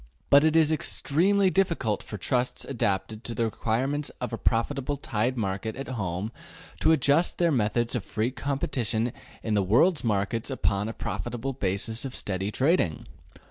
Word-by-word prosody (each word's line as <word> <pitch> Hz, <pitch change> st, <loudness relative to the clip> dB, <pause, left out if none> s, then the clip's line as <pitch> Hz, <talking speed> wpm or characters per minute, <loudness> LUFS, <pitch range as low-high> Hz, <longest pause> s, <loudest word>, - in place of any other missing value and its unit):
But 140 Hz, +1 st, +8 dB
it 160 Hz, 0 st, +3 dB
is 160 Hz, -1 st, +5 dB
extremely 185 Hz, +6 st, +2 dB
difficult 170 Hz, -, +1 dB
for 105 Hz, -, -7 dB
trusts 125 Hz, +5 st, -1 dB
adapted 105 Hz, -3 st, -2 dB
to 120 Hz, -, -5 dB
the 115 Hz, -, +1 dB
requirements 130 Hz, +7 st, -1 dB
of 125 Hz, -1 st, -4 dB
a -, -, -1 dB
profitable 135 Hz, +4 st, 0 dB
tied 125 Hz, -1 st, -1 dB
market 100 Hz, +1 st, -2 dB
at 135 Hz, +1 st, -6 dB
home 100 Hz, -3 st, -3 dB, 0.5 s
to 160 Hz, -, +4 dB
adjust 155 Hz, +2 st, +3 dB
their 170 Hz, -1 st, +3 dB
methods 120 Hz, -2 st, +1 dB
of 120 Hz, -, -1 dB
free 110 Hz, +5 st, -1 dB
competition 125 Hz, -4 st, -1 dB, 0.3 s
in 110 Hz, -, -1 dB
the 105 Hz, -, +3 dB
world 125 Hz, -, +3 dB
markets 110 Hz, +2 st, 0 dB
upon 105 Hz, -5 st, 0 dB
a -, -, -4 dB
profitable 125 Hz, +4 st, -4 dB
basis 110 Hz, 0 st, -2 dB
of 135 Hz, -2 st, -5 dB
steady 95 Hz, 0 st, -2 dB
trading. 130 Hz, -, +1 dB
120 Hz, 160 wpm, -27 LUFS, 105-140 Hz, 0.5 s, But